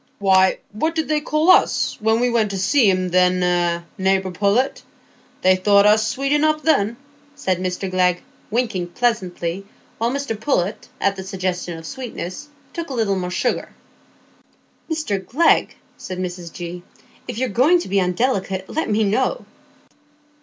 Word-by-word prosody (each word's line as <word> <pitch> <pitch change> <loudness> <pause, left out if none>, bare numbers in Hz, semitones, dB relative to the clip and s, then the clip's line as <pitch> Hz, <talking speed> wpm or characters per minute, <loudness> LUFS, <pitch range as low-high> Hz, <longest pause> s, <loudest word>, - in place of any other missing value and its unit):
"Why, 190 -1 +4
what 315 +11 -1
did 320 -1 -1
they 305 -1 +1
call 310 +4 +3
us, - - +3
when 220 +1 +2
we 245 0 +1
went 225 -3 +2
to 195 - -4
see 220 +4 +3
'em, 185 -1 +1
then, 180 0 +3
eh, 175 -1 +1 0.2
neighbour 190 0 +1
Pullet? 205 +8 +1 0.6
They 185 0 +5
thought 200 +2 +4
us 215 +1 +4
sweet 275 +4 -2
enough 305 +1 +2
then," 235 -7 +2 0.4
said 190 -10 -1
Mr 185 +1 -3
Glegg, 180 -1 +1 0.3
winking 215 -6 -1
pleasantly; 190 -6 -1 0.4
while 230 +1 +1
Mr 280 -3 -2
Pullet, 205 -7 -1
at 200 0 +1
the 190 - -6
suggestion 185 -3 -3
of 165 - -10
sweetness, 245 - -6 0.3
took 335 -2 -5
a 265 - -4
little 215 -4 +1
more 180 -1 -3
sugar. 180 - -1 1.2
"Mr 300 -12 -2
Glegg," 315 - +2 0.2
said 185 -1 -7
Mrs 180 -2 -5
G., 175 0 -7 0.5
"if - - -5
you're 260 +1 0
going 260 - +4
to - - -7
be 195 +1 +1
undelicate, 190 -1 -1
let 320 -6 -2
me 215 +1 +2
know." 260 - 0
200 Hz, 160 wpm, -21 LUFS, 185-250 Hz, 1.2 s, They